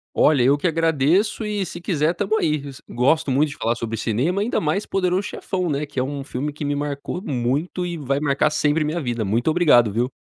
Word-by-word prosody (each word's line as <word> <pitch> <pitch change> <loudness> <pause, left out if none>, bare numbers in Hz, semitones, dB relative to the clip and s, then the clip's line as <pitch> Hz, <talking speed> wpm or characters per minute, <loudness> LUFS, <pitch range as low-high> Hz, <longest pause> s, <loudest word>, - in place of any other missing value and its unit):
Olha, 140 -5 +4
eu 140 +3 +3
que 180 - +1
agradeço 165 - +1
e 210 -2 -2
se 175 -1 -8
quiser, 165 -3 +1
estamos 205 +4 -1
aí. 150 -2 0 0.3
Gosto 140 +4 +1
muito 145 +3 +2
de 145 - -9
falar 115 +1 0
sobre 115 -1 -4
cinema, 130 - 0
ainda 230 - 0
mais 165 +7 0
O - - -16
Poderoso 185 0 +1
Chefão, 185 -3 -3
né, 145 +1 -2
que 140 -3 -4
é - - +2
um 140 +1 -4
filme 145 +2 -4
que 150 - -7
me 145 0 -1
marcou 145 +4 -4
muito 140 - -1
e 175 -1 -3
vai 140 -1 -1
marcar 145 +1 +1
sempre 150 +1 +1
minha 155 +3 -2
vida. 120 -5 -2
Muito 115 +9 +1
obrigado, 145 - +4
viu. 120 +5 -1
150 Hz, 220 wpm, -22 LUFS, 135-175 Hz, 0.3 s, Olha